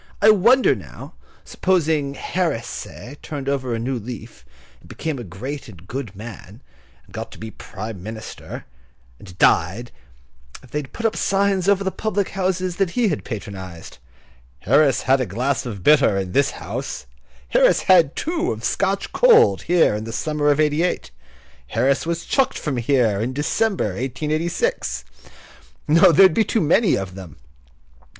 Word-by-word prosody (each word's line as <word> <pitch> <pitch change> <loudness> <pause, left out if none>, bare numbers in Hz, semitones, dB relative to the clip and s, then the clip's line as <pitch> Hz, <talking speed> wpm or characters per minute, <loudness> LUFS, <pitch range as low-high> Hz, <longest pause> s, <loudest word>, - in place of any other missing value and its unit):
I 215 +1 +7
wonder 235 +6 +4
now, - - -10 0.3
supposing 155 -6 0
Harris, 160 -8 -2
say, 140 +4 -8
turned 140 -3 -6
over 130 -4 -1
a - - -2
new 125 +2 -2
leaf, 115 - -9 0.4
and - - -19
became 155 -4 -4
a - - -6
great 130 - -7
and 90 -4 -14
good 120 -5 -6
man, 110 +1 -10 0.4
and - - -21
got - - -6
to - - -12
be 110 0 -8
Prime 110 -2 -8
Minister, 110 +3 -8 0.5
and 90 -3 -13
died, 115 +8 +2 0.7
if 125 - -17
they 150 - -1
would 140 -2 -8
put 230 - -6
up 225 - +1
signs 195 -1 +1
over 200 -1 +3
the 190 - -1
public 205 -2 -2
houses 185 -2 -2
that 195 -3 +1
he 235 -4 +3
had 155 - -3
patronised: 95 - -8 0.6
"Harris 140 - +3
had 130 +1 +3
a 125 - -1
glass 125 +8 -1
of 100 -6 -7
bitter 145 -9 +5
in 95 -2 -3
this 140 +8 +3
house;" 60 - -6 0.4
"Harris - - +4
had 170 -5 +5
two 345 +4 -1
of - - -6
Scotch - - -1
cold 465 -2 +5
here 175 -9 +3
in 105 +1 -4
the 115 - -6
summer 150 +3 0
of 145 0 +2
'88;" 155 +3 0 0.6
"Harris 135 - +1
was 170 0 -2
chucked 270 -2 +1
from 145 -5 -3
here 115 -4 +1
in 125 +3 -2
December, 180 - 0
1886." 155 - -2 0.8
No, 165 +3 +6
there 190 +5 +7
would 185 - +4
be 225 - +3
too 225 - 0
many 175 +5 +3
of 95 -2 -4
them! 90 -6 -10
140 Hz, 165 wpm, -21 LUFS, 115-180 Hz, 0.8 s, I